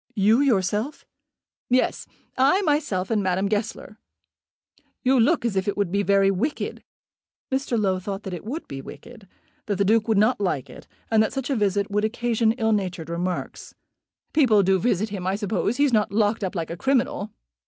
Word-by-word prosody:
"You, 215 Hz, +4 st, +4 dB
yourself?" 215 Hz, +1 st, 0 dB, 0.6 s
"Yes; 255 Hz, +1 st, +1 dB, 0.3 s
I 285 Hz, +10 st, +3 dB
myself, 290 Hz, -, 0 dB
and 215 Hz, -2 st, +2 dB
Madame 190 Hz, +1 st, 0 dB
Goesler. 215 Hz, +1 st, -3 dB, 1.0 s
You 260 Hz, 0 st, +3 dB
look 230 Hz, +1 st, +3 dB
as 225 Hz, -4 st, -1 dB
if 190 Hz, +1 st, 0 dB
it 205 Hz, -, -1 dB
would 200 Hz, -4 st, 0 dB
be 200 Hz, +1 st, +1 dB
very 195 Hz, -1 st, +3 dB
wicked." 240 Hz, +11 st, -3 dB, 0.7 s
Mr. 265 Hz, -3 st, 0 dB
Low 190 Hz, -3 st, +1 dB
thought 195 Hz, +2 st, -5 dB
that 190 Hz, -, -6 dB
it 175 Hz, -, -6 dB
would 280 Hz, +10 st, -5 dB
be 135 Hz, -1 st, -6 dB
wicked; 225 Hz, -, -12 dB, 0.4 s
that 205 Hz, -, 0 dB
the 200 Hz, +1 st, +1 dB
Duke 220 Hz, +2 st, +3 dB
would 220 Hz, -2 st, +2 dB
not 215 Hz, +2 st, +3 dB
like 160 Hz, -9 st, -2 dB
it; -, -, -13 dB, 0.2 s
and 220 Hz, -1 st, +5 dB
that 220 Hz, -, 0 dB
such 270 Hz, 0 st, -3 dB
a -, -, +1 dB
visit 200 Hz, -2 st, 0 dB
would 210 Hz, +1 st, 0 dB
occasion 230 Hz, 0 st, +1 dB
ill 225 Hz, -2 st, 0 dB
natured 180 Hz, -6 st, -2 dB
remarks. 175 Hz, +1 st, -4 dB, 0.6 s
"People 230 Hz, -9 st, +4 dB
do 190 Hz, 0 st, +3 dB
visit 215 Hz, 0 st, 0 dB
him, 190 Hz, -3 st, -5 dB
I 190 Hz, -, +1 dB
suppose. 210 Hz, +2 st, -1 dB
He's 285 Hz, -3 st, +2 dB
not 210 Hz, -3 st, +2 dB
locked 210 Hz, +1 st, +1 dB
up 190 Hz, 0 st, -3 dB
like 165 Hz, -2 st, -3 dB
a 170 Hz, -, -5 dB
criminal." 250 Hz, -4 st, 0 dB
210 Hz, 185 wpm, -24 LUFS, 195-235 Hz, 1.0 s, and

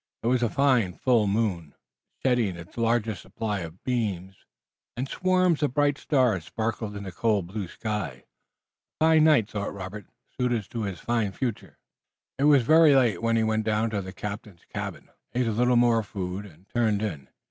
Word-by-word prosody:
It -, -, 0 dB
was 125 Hz, -1 st, +2 dB
a 120 Hz, -, +2 dB
fine 130 Hz, -9 st, +2 dB
full 115 Hz, 0 st, +2 dB
moon, 100 Hz, -8 st, -1 dB, 0.5 s
shedding 120 Hz, -8 st, +2 dB
its 85 Hz, -1 st, -12 dB
largest 115 Hz, -3 st, 0 dB
supply 105 Hz, -3 st, -3 dB
of 85 Hz, +1 st, -9 dB
beams, 100 Hz, -7 st, -2 dB, 0.6 s
and 130 Hz, +2 st, -2 dB
swarms 185 Hz, 0 st, +2 dB
of 145 Hz, -4 st, 0 dB
bright 145 Hz, -1 st, +2 dB
stars 125 Hz, -, +1 dB
sparkled 110 Hz, -1 st, -3 dB
in 100 Hz, -, -6 dB
the 95 Hz, -, -6 dB
cold, 105 Hz, 0 st, +1 dB
blue 95 Hz, +1 st, -5 dB
skies. 105 Hz, -6 st, -4 dB, 0.8 s
A 160 Hz, -, +4 dB
fine 160 Hz, -1 st, +5 dB
night, 140 Hz, -10 st, +4 dB
thought 100 Hz, -1 st, -4 dB
Robert, 100 Hz, +2 st, -7 dB, 0.3 s
suited 120 Hz, -5 st, -1 dB
to 115 Hz, -3 st, -3 dB
his 95 Hz, -4 st, -5 dB
fine 115 Hz, -4 st, -1 dB
future. 120 Hz, -5 st, -4 dB, 0.6 s
It 140 Hz, -, +3 dB
was 145 Hz, -4 st, +6 dB
very 155 Hz, +2 st, +6 dB
late, 120 Hz, -8 st, +3 dB
when 115 Hz, 0 st, +1 dB
he 110 Hz, -, +2 dB
went 110 Hz, 0 st, +1 dB
down 110 Hz, +1 st, 0 dB
to 100 Hz, -2 st, -1 dB
the 95 Hz, 0 st, -7 dB
captain's 100 Hz, -1 st, -7 dB
cabin, -, -, -5 dB, 0.3 s
ate 125 Hz, 0 st, +2 dB
a 115 Hz, -, 0 dB
little 125 Hz, +3 st, +2 dB
more 120 Hz, -1 st, +4 dB
food 100 Hz, -1 st, -5 dB
and 90 Hz, +2 st, -19 dB
turned 110 Hz, -3 st, +1 dB
in. 75 Hz, -11 st, -4 dB
110 Hz, 180 wpm, -26 LUFS, 100-125 Hz, 0.8 s, was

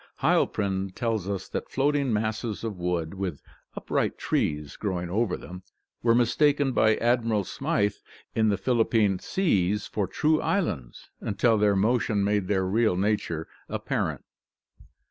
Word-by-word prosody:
Heil -, -, +3 dB
prin 95 Hz, -2 st, -2 dB
tells 110 Hz, -1 st, -2 dB
us 100 Hz, -2 st, -3 dB
that -, -, -4 dB
floating 140 Hz, -1 st, +1 dB
masses 110 Hz, +1 st, -2 dB
of 105 Hz, -5 st, -4 dB
wood, 85 Hz, -2 st, -1 dB
with 95 Hz, -6 st, -4 dB, 0.3 s
upright -, -, -1 dB
trees 75 Hz, -1 st, -1 dB
grow 95 Hz, -4 st, -2 dB
ing 85 Hz, 0 st, -5 dB
over 105 Hz, -1 st, 0 dB
them, 90 Hz, +1 st, -9 dB, 0.4 s
were 115 Hz, -1 st, +4 dB
mistaken 140 Hz, +4 st, +3 dB
by 110 Hz, -3 st, +4 dB
Admiral 115 Hz, -3 st, +1 dB
Smyth 100 Hz, +2 st, -1 dB, 0.3 s
in 110 Hz, -1 st, +2 dB
the 100 Hz, -, +1 dB
Philippine 110 Hz, -5 st, +2 dB
seas 105 Hz, -, +1 dB
for 100 Hz, -3 st, -2 dB
true 155 Hz, -, +1 dB
islands, 80 Hz, -, -2 dB
until 110 Hz, +3 st, +2 dB
their 105 Hz, -1 st, +3 dB
motion 105 Hz, 0 st, +2 dB
made 100 Hz, -2 st, +1 dB
their 95 Hz, -2 st, +1 dB
real 105 Hz, 0 st, +2 dB
nature 95 Hz, -5 st, -1 dB, 0.2 s
ap -, -, -4 dB
parent. -, -, -2 dB
105 Hz, 145 wpm, -26 LUFS, 95-115 Hz, 0.4 s, were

